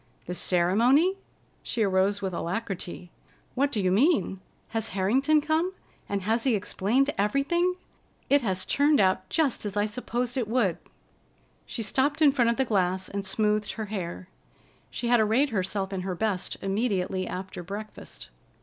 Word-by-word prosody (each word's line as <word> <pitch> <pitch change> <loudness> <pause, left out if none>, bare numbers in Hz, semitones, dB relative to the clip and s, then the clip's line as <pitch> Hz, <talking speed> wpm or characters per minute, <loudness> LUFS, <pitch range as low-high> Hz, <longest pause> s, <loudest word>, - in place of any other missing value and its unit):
"The 180 - -4
ceremony?" 235 - +3 0.4
She 225 - -1
arose 195 +1 +1
with 190 -1 -2
alacrity. 180 -1 -4 0.4
"What 280 +2 +1
do 215 - -1
you 185 -2 +1
mean? 240 - +2 0.3
Has 225 -1 -2
Harrington 270 +11 +3
come, 320 +5 0 0.4
and 200 -1 -2
has 225 +3 +1
he 255 -4 +3
explained 240 +8 +1
everything? 285 - +1 0.5
It 285 +1 +4
has 190 -5 -1
turned 290 +1 +3
out 185 -1 +2
just 300 -6 +1
as 205 -1 -4
I 205 - +3
supposed 245 +3 -3
it 240 -4 0
would." 220 -6 +1 0.9
She 230 - -4
stopped 270 +8 +1
in 300 -3 +6
front 245 -4 +2
of 235 - 0
the 265 - +2
glass 185 -4 0
and 200 0 -3
smoothed 210 +1 0
her 220 - -4
hair. 180 -2 -5 0.6
She 240 - -4
had 240 -1 +5
arrayed 225 +7 +3
herself 195 -2 -2
in 190 - -2
her 185 0 -3
best 200 -1 -2
immediately 195 -2 -1
after 185 0 -6
breakfast. 195 - -8
210 Hz, 160 wpm, -27 LUFS, 190-260 Hz, 0.9 s, in